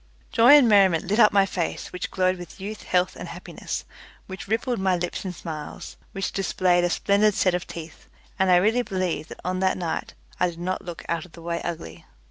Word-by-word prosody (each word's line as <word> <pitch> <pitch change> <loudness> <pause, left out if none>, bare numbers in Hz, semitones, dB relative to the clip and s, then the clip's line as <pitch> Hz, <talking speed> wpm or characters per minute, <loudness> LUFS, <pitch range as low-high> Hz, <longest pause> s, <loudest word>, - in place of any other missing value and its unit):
Joy 240 +4 +7
and 270 -5 +5
merriment 195 -6 +5
lit 205 +5 0
up 210 - +7
my 200 -1 +4
face, 180 -3 -3
which 180 - -4
glowed 185 -1 +1
with 175 +1 -10
youth, 210 +3 -6
health, 180 0 +1
and - - -7
happiness, - - -6 0.4
which 190 0 -8
rippled 230 +3 -1
my 190 -1 +2
lips 175 0 -3
in 185 - -2
smiles, 155 -3 -7 0.2
which 195 -1 -3
displayed 180 -2 +1
a 175 - +2
splendid 200 +3 +2
set 185 - +2
of 180 -1 -2
teeth, 160 -2 -10 0.3
and 190 0 +3
I 180 - +7
really 215 +7 +3
believe 185 -8 -2
that - - -10
on 185 0 -1
that 190 0 +1
night 170 -3 -4 0.2
I 180 - +3
did 170 -1 -10
not 185 +2 -2
look 175 -2 -8
out 170 -1 -2
of 180 - -18
the 170 - -12
way 170 0 -2
ugly. 85 - -6
185 Hz, 215 wpm, -25 LUFS, 175-195 Hz, 0.4 s, Joy